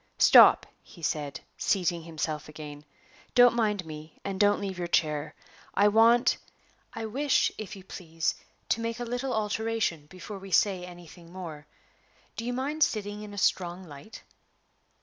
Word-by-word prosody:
"Stop," - - +8 0.2
he 170 - -16
said, 145 -3 -2 0.2
seating 175 -3 +1
himself 155 -2 -4
again; 150 -1 -9 0.5
"don't 245 -1 +7
mind 210 -5 0
me; 155 0 -10
and 195 -1 -3
don't 205 0 +4
leave 195 -2 -5
your 175 - -2
chair. 150 -3 0 0.4
I 205 +1 +5
want 230 +3 +5 0.5
I 225 - -5
wish, 265 +5 +1
if 215 0 -6
you 190 - -12
please, 165 -3 -3 0.4
to 230 - +1
make 230 +1 -3
a - - -2
little 245 +3 -3
alteration, 215 -7 -1
before 185 +4 -9
we 195 0 -10
say 190 0 +2
anything 175 -1 -13
more. 160 -5 -8 0.7
Do 230 - -5
you 245 - -1
mind 275 +5 -3
sitting 210 -3 -2
in 210 -1 -8
a 205 - -9
strong 180 -1 0
light?" 155 +6 -12
190 Hz, 155 wpm, -28 LUFS, 165-220 Hz, 0.7 s, Stop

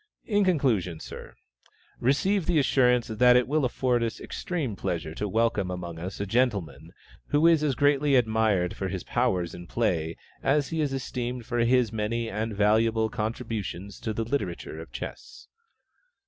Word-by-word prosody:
In 205 -2 +2
conclusion, 120 - +1
Sir, - - -9 0.6
receive 165 +8 +1
the 175 -2 +2
assurance 125 -3 +3
that 125 +3 +4
it 125 0 +4
will 150 +2 +1
afford 125 -1 +1
us 115 -1 -2
extreme 150 - -3
pleasure 80 -4 -3
to 105 +5 -3
welcome 105 -2 +1
among 85 -2 -5
us 90 +3 -6
a 100 - -1
gentleman, 105 -5 0 0.4
who 145 +2 +2
is 165 -2 +5
as 140 -4 +1
greatly 145 +1 +3
admired 110 -6 +2
for 95 - -3
his 95 -2 -4
powers 95 -9 0
in 85 0 -9
play 85 -8 -1 0.2
as 145 0 +2
he 160 -1 -1
is 145 -2 0
esteemed 125 -2 -4
for 120 - -2
his 120 -1 +3
many 115 +2 -1
and 110 +1 -3
valuable 110 +2 +3
contributions 110 -4 -4
to 110 - -3
the 115 +1 -2
literature 140 +5 -3
of - - -12
chess. 435 -1 -8
115 Hz, 160 wpm, -27 LUFS, 100-135 Hz, 0.6 s, is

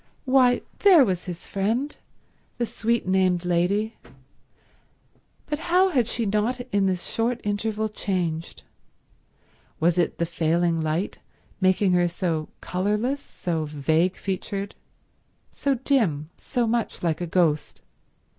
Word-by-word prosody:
Why, 255 -2 +4 0.2
there 355 -9 +7
was 185 -4 -2
his 175 -2 -7
friend, 230 +9 -1 0.6
the 240 - 0
sweet 235 +1 -1
named 185 -2 +2
lady—but 180 - -5
how 360 +3 +3
had 250 - +2
she 235 -1 -1
not 215 +5 0
in 200 -1 +2
this 185 -2 -1
short 235 +1 -1
interval 215 +1 -1
changed! 175 -6 -3 1.2
Was 170 +2 +2
it 170 - +1
the 170 - 0
failing 165 +1 +1
light 155 +5 -2 0.4
making 190 0 +3
her 175 0 +3
so 170 -3 -2
colourless, 210 +9 -1
so 165 - -3
vague 155 +5 +1
featured, 200 +1 -4 0.8
so 280 -1 0
dim, 210 - 0
so 245 -2 -1
much 230 -3 -1
like 165 -1 0
a 175 - -2
ghost? 165 -3 +1
195 Hz, 120 wpm, -25 LUFS, 170-235 Hz, 1.2 s, there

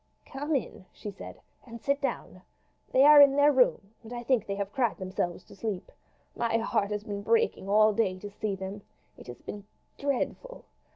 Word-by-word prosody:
"Come 290 +3 -3
in," 195 -7 -4
she 210 - -8
said, 195 - -11 0.2
"and 235 -2 -10
sit 280 +4 -1
down. 275 - -4 0.5
They 260 - +5
are 295 0 +9
in 280 -1 +7
their 285 +1 +5
room, 245 -6 +2
and 230 0 -13
I 240 0 -5
think 240 -3 +1
they 200 - -2
have 200 0 -4
cried 240 -6 0
themselves 185 -2 -3
to - - -16
sleep. 200 -2 -5 0.4
My 230 -1 0
heart 215 -3 0
has 210 -1 -3
been 205 -1 -5
breaking 450 - +1
all 215 +1 +5
day 200 -4 0
to 205 +2 -9
see 205 -1 -3
them. 190 +2 -7 0.3
It - - -14
has 120 - -10
been 205 -1 -7 0.4
dreadful. 285 - -3
220 Hz, 190 wpm, -28 LUFS, 200-270 Hz, 0.5 s, are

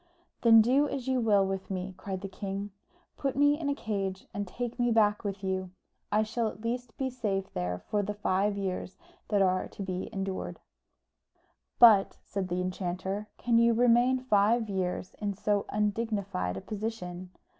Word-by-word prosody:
"Then 225 -2 +8
do 275 +5 +3
as 265 -2 -4
you 260 -1 +2
will 205 -3 +4
with 195 0 -4
me!" 190 0 -4
cried 190 -1 -5
the 195 - -4
king. 200 +1 -5 0.5
"Put 275 -2 -1
me 290 +2 +4
into 285 -3 0
a - - -8
cage 195 -6 -3
and 200 0 -3
take 240 +5 -5
me 240 0 +3
back 210 -2 +3
with 200 -1 -4
you. 190 -1 -2 0.4
I 210 +1 +3
shall 225 +1 -1
at 215 - -7
least 240 0 -3
be 265 -1 -1
safe 200 -6 -2
there 90 0 -2
for 205 - -2
the 205 +1 -3
five 200 0 +1
years 190 -1 -3 0.3
that 205 -2 +3
are 185 0 +1
to 200 - -7
be 185 -1 -4
endured." 195 -2 -4 1.2
"But," 215 -5 +7
said 195 -2 -3
the 180 0 -1
enchanter, 185 +2 -3
"can 235 -1 +3
you 235 0 +4
remain 245 +2 +4
five 225 -2 +2
years 185 -1 -2
in 205 -2 -2
so 205 0 0
undignified 205 - -1
a - - -5
position? 200 -4 -5
205 Hz, 175 wpm, -29 LUFS, 190-230 Hz, 1.2 s, Then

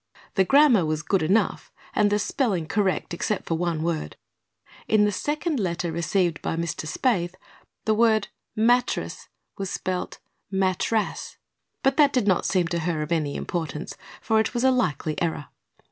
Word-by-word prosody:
The 190 - +3
grammar 275 - +5
was 155 0 -1
good 195 +1 +1
enough 190 +8 +1 0.2
and 210 -1 +3
the 205 - +2
spelling 210 - 0
correct 195 -3 0
except 195 +4 -2
for - - -1
one 165 -1 -1
word. 165 - -2 0.7
In 215 -1 +4
the 210 - +1
second 295 - -1
letter 175 -3 -1
received 170 0 0
by - - -2
Mr. 165 -2 -3
Spaythe 180 - 0 0.5
the 220 - +3
word 220 -1 +3 0.3
"mattress" 240 +3 +1 0.3
was 195 -1 -3
spelled 185 0 -3 0.3
"mattrass"; 195 +3 -1 0.5
but 270 0 +2
that 290 -2 +5
did 250 -5 +1
not 185 -3 +2
seem 180 -3 +1
to 170 - -1
her 160 -2 -1
of 150 - -8
any 155 -4 0
importance, 160 -2 -4 0.3
for 220 -1 +2
it 220 +3 -1
was 240 - 0
a 265 - +5
likely 155 - -1
error. 160 -4 -2
190 Hz, 160 wpm, -25 LUFS, 165-220 Hz, 0.7 s, grammar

